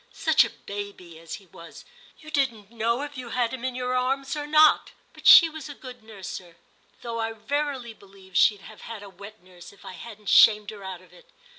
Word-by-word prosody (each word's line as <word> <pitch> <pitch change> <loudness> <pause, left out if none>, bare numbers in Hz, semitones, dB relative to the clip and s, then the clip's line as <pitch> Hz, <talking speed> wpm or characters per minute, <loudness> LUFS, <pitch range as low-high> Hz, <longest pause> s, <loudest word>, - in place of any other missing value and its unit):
Such - - +4
a - - -4
baby 200 -5 -9
as 165 0 -8
he 200 - -14
was! 170 -1 -14 0.3
you 310 0 -13
didn't 235 -8 -1
know 235 +3 -1
if 290 -1 -8
you 245 -2 -8
had 240 0 -1
him 255 -2 -7
in 260 -1 -3
your 250 0 -2
arms 270 +2 -1
or 295 -1 -5
not 310 0 +4 0.2
But - - -5
she 335 - +10
was 315 -2 -9
a 290 - -8
good 250 -3 -11
nurser, 190 -5 -9 0.5
though 230 -1 -4
I 225 0 -2
verily 260 +1 -3
believe 195 -3 -19
she'd 205 +1 +4
have 215 +1 -13
had 225 -3 -9
a 200 - -10
wet 200 +2 -13
nurse 180 -1 -14
if 200 - -19
I - - -8
hadn't 210 +3 -9
shamed 210 -1 +6
her 205 -2 -11
out 185 -1 -8
of - - -22
it. - - -19
225 Hz, 220 wpm, -25 LUFS, 200-260 Hz, 0.5 s, she